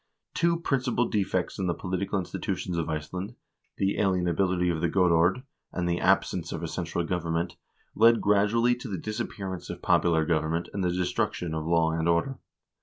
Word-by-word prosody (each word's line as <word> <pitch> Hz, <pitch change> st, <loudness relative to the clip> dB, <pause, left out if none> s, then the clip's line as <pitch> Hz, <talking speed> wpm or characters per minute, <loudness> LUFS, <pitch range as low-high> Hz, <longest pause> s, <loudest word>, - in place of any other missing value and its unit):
Two 170 Hz, -1 st, +2 dB
principal 130 Hz, -6 st, 0 dB
defects 95 Hz, -3 st, -1 dB
in 95 Hz, -, 0 dB
the 85 Hz, -, 0 dB
political 95 Hz, +2 st, -2 dB
institutions 90 Hz, -1 st, -3 dB
of 85 Hz, -2 st, -2 dB
Iceland, 90 Hz, +8 st, -4 dB, 0.4 s
the 100 Hz, +1 st, 0 dB
alien 95 Hz, -3 st, +2 dB
ability 90 Hz, 0 st, +1 dB
of 80 Hz, -2 st, -3 dB
the 85 Hz, -, +1 dB
godord, 90 Hz, +5 st, +3 dB, 0.3 s
and 90 Hz, -1 st, -2 dB
the 85 Hz, 0 st, 0 dB
absence 95 Hz, -2 st, +1 dB
of 80 Hz, -, -4 dB
a -, -, -2 dB
central 85 Hz, +1 st, -3 dB
government, 85 Hz, 0 st, -2 dB, 0.4 s
led 115 Hz, +1 st, +5 dB
gradually 105 Hz, +4 st, +3 dB
to 125 Hz, -, -8 dB
the 100 Hz, -4 st, -3 dB
disappearance 100 Hz, -3 st, -5 dB
of -, -, -7 dB
popular 80 Hz, -2 st, +3 dB
government 80 Hz, +1 st, 0 dB
and 100 Hz, -, -2 dB
the 90 Hz, -, +2 dB
destruction 90 Hz, -1 st, -1 dB
of 80 Hz, 0 st, -3 dB
law 85 Hz, -1 st, +3 dB
and 80 Hz, +1 st, 0 dB
order. 120 Hz, +11 st, +1 dB
90 Hz, 175 wpm, -27 LUFS, 85-100 Hz, 0.4 s, led